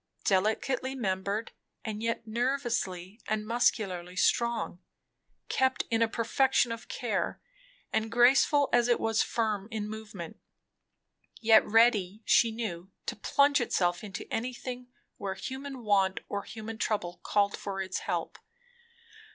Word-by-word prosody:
Delicately 220 +7 +1
membered, 200 -1 -2 0.3
and 215 -1 -4
yet 230 0 -2
nervously 230 -5 -2
and 215 0 -1
muscularly 195 -6 0
strong; 235 -1 +1 0.7
kept 260 -1 +1
in 225 0 +2
a 230 - +5
perfection 240 +2 +2
of 230 0 -6
care, - - -2 0.5
and 220 0 0
graceful 270 +4 +5
as 240 0 +4
it 240 - +3
was 225 -1 +2
firm 215 -3 -1
in 215 -2 -3
movement; 210 -6 -8 1.0
yet 220 -1 +6
ready, 220 -2 +3
she 230 - +5
knew, 195 -6 -5 0.2
to - - -3
plunge 280 +6 +3
itself 175 -6 0
into 205 -2 -6
anything 250 +1 -4 0.3
where 195 -1 -4
human 265 +3 -6
want 195 -3 +2
or 200 - -3
human 220 +1 -8
trouble 190 -7 -1
called 200 -1 +2
for 195 -1 -5
its 190 -1 -2
help. - - -3
220 Hz, 125 wpm, -29 LUFS, 200-240 Hz, 1.0 s, yet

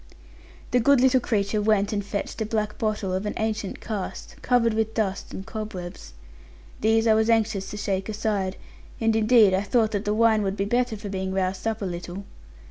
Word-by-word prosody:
The 250 - +4
good 280 +3 +5
little 260 +1 +5
creature 210 -3 0
went 210 -1 +2
and 205 -1 -1
fetched 200 +3 -4
a - - +1
black 215 -1 -2
bottle 210 -4 -1
of 190 +3 -2
an - - -3
ancient 215 -3 -2
cast, 210 -4 -5
covered 240 -2 +2
with 220 0 -1
dust 200 -3 -2
and 190 - -7
cobwebs. 185 - -7 0.7
These 225 +1 +3
I 220 - +5
was 220 +1 +2
anxious 215 -4 +1
to 210 - -6
shake 195 0 -2
aside; 205 -3 -1 0.4
and 225 -1 +2
indeed 220 -2 +5
I 190 - +2
thought 220 +1 +1
that 205 0 -2
the 210 0 +1
wine 220 -1 +4
would 195 0 -2
be 195 - 0
better 240 +1 0
for 205 0 -7
being 190 -1 -3
roused 190 +2 -1
up 220 -2 -2
a - - -1
little. 175 +2 -5
215 Hz, 200 wpm, -25 LUFS, 195-225 Hz, 0.7 s, good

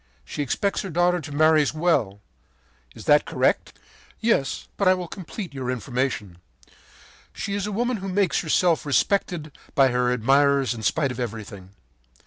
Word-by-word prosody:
She 150 - -5
expects 195 - -1
her 195 - -6
daughter 175 +1 +2
to 145 - -9
marry 155 +1 +4
well. 135 - +1 0.7
Is - - -11
that - - +5
correct?” - - 0 0.4
“Yes, 220 -12 0
but 200 - +1
I 185 - +6
will 180 -1 -5
complete 185 0 -7
your 130 -2 -4
information. 120 -6 -3 0.9
She 200 - -4
is 200 0 -2
a - - -3
woman 240 +3 -1
who 195 0 -5
makes 185 -4 +1
herself 170 +1 +2
respected 155 - 0 0.2
by 135 -1 +5
her 125 0 +1
admirers 135 +1 +3
in 115 - -8
spite 140 +3 +1
of 125 - -7
everything. 100 -5 -7
145 Hz, 155 wpm, -24 LUFS, 125-180 Hz, 0.9 s, I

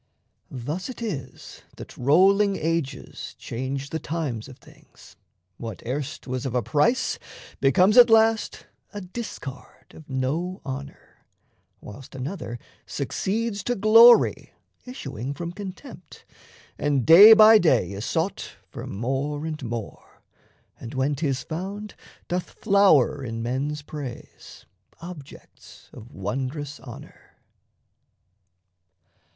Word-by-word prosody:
Thus 150 - -5
it 255 - -8
is 160 - -7 0.2
That - - -10
rolling 195 +9 +4
ages 160 -6 -4
change 135 +3 -5
the 160 - -2
times 145 -10 -4
of 130 -2 -13
things: - - -19 0.4
What 115 -4 -8
erst 140 +4 -4
was 130 -1 -4
of 130 -2 -4
a 125 - +1
price, 195 - +1 0.4
becomes 180 - +4
at 245 -1 +9
last 225 0 +2 0.3
A 205 - -5
discard 185 - -9
of 155 - -15
no 150 +8 -2
honour; 140 +1 -9 0.6
whilst 125 +6 -12
another 135 -2 -5 0.3
Succeeds 210 0 -3
to 245 - 0
glory, 225 +3 +6 0.3
issuing 135 - -6
from 170 +1 -5
contempt, 200 +8 -10 0.5
And 145 -4 0
day 195 +8 +10
by 220 0 +8
day 160 - +2
is 100 +1 -6
sought 165 +8 -3 0.2
for - - -8
more 135 +7 -3
and 155 -3 -5
more, 115 -3 -8 0.6
And, 115 - -9
when 135 +3 0
'tis 140 -2 -2
found, 195 +6 -6 0.3
doth 180 0 -3
flower 195 - +3
in 115 -2 -5
men's 140 +5 -3
praise, 145 -5 -10 0.3
Objects 165 -5 -13
of 110 - -12
wondrous 130 - -5
honour. 120 -1 -13
150 Hz, 115 wpm, -24 LUFS, 130-195 Hz, 0.6 s, day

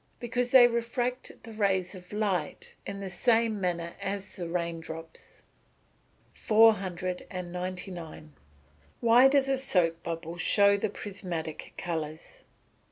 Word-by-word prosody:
_ - - -39
Because 245 0 -1
they 255 -1 +8
refract 240 +1 -2
the 225 - -10
rays 195 -4 +1
of 180 -2 -12
light 200 -7 -1
in 200 0 -5
the 195 - -4
same 225 +1 +2
manner 170 -2 -2
as 195 0 -4
the 175 -2 -5
rain 170 -1 -2
drops. 165 0 -10 0.9
499. 180 - 0 0.7
_Why 240 +3 +7
does 275 -1 +3
a 270 -1 +1
soap 175 -10 +1
bubble 165 0 -5
show 200 +3 +4
the 200 - -1
prismatic 175 -6 -6
colours? 160 -2 -5
185 Hz, 120 wpm, -29 LUFS, 170-225 Hz, 0.9 s, they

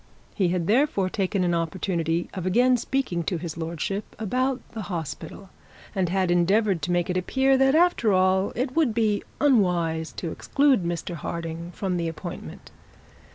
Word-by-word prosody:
He 190 -4 +1
had 175 -1 0
therefore 210 - +2
taken 195 -1 0
the 175 -1 +1
opportunity 170 0 -1
of 185 -2 -4
again 250 +7 +4
speaking 245 -7 -1
to 180 - -1
his 165 -1 -5
lordship 170 +5 -4
about 255 +5 0
the 225 - -5
hospital, 175 +3 -6 0.4
and 190 -4 0
had 185 -1 +1
endeavoured 190 +1 +2
to 170 +5 -2
make 175 -1 +1
it 180 - -1
appear 265 +9 +2
that 270 +2 +4
after 335 -10 +3
all 185 +1 +3
it 255 +2 -2
would 295 -9 +2
be 215 -3 +2 0.2
unwise 175 - +2
to 165 - -4
exclude 275 -8 +2
Mr 170 +1 -3
Harding 165 +1 -5
from 185 -3 -1
the 170 -1 -1
appointment. 165 - -8
185 Hz, 160 wpm, -25 LUFS, 170-230 Hz, 0.4 s, again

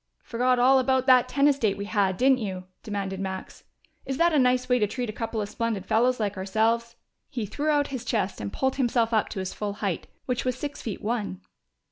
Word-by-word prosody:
"Forgot 250 +2 +1
all 260 +2 +5
about 260 0 +2
that 255 -1 +5
tennis 280 +1 +3
date 205 -5 +1
we 200 - -4
had, 200 -3 +1
didn't 260 +1 +4
you?" 190 -4 -4 0.2
demanded 195 -2 -4
Max. 190 -1 -6 0.4
"Is 270 - -3
that 340 +1 +3
a 300 - +4
nice 250 0 +3
way 250 0 +3
to 210 - +2
treat 245 +1 -3
a - - -16
couple 225 -1 -3
of 205 - -2
splendid 220 -3 -2
fellows 240 +5 +2
like 205 -2 -1
ourselves?" 225 +4 0 0.3
He 240 -7 -3
threw 290 +9 -2
out 290 -1 +2
his 260 -4 -4
chest 210 - -1
and 100 -1 -4
pulled 265 - -1
himself 235 -3 +1
up 220 - +2
to - - -5
his 190 -1 -4
full 205 -1 -3
height, 200 -4 -3 0.2
which 250 -1 -1
was 255 -1 -1
six 290 +2 -5
feet 215 -5 -5
one. 210 -4 -2
230 Hz, 220 wpm, -26 LUFS, 205-255 Hz, 0.4 s, all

